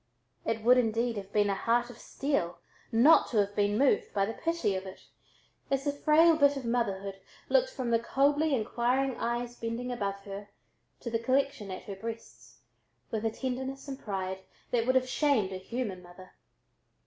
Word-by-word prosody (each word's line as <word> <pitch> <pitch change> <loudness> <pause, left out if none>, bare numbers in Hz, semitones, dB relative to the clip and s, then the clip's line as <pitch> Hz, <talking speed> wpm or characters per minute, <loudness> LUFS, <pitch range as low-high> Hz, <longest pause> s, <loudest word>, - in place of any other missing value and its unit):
It 225 -1 -1
would, 250 +2 +6
indeed, 230 0 0
have 195 -1 -7
been 205 -1 +2
a - - +1
heart 240 +4 +1
of 240 - -15
steel 270 - -2 0.3
not 245 +8 +6
to 230 - -1
have 205 0 +1
been 205 0 +2
moved 275 +2 +2
by 195 -1 +3
the 225 - -4
pity 330 -10 -1
of 190 0 -4
it, 190 - -11 0.6
as 275 0 0
the 285 - +1
frail 315 +3 +5
bit 285 -2 +4
of 265 - -5
motherhood 200 -5 -1 0.3
looked - - +3
from 255 - -3
the 230 - +4
coldly 285 +5 +2
inquiring 245 +3 0
eyes 240 +1 -2
bending 230 +2 -4
above 200 -5 -2
her, 200 +1 -8 0.5
to 235 - -5
the 230 - +1
collection 255 -3 0
at 185 - -6
her 200 - -7
breasts, 130 - -9 0.5
with 220 -1 -2
a - - +3
tenderness 265 +3 -4
and 270 -1 -6
pride 190 -2 -4 0.3
that 235 -1 +1
would 255 - +3
have 255 0 +3
shamed 255 -9 +1
a 190 - -4
human 195 -1 -4
mother. 180 +1 -14
230 Hz, 185 wpm, -30 LUFS, 200-265 Hz, 0.6 s, would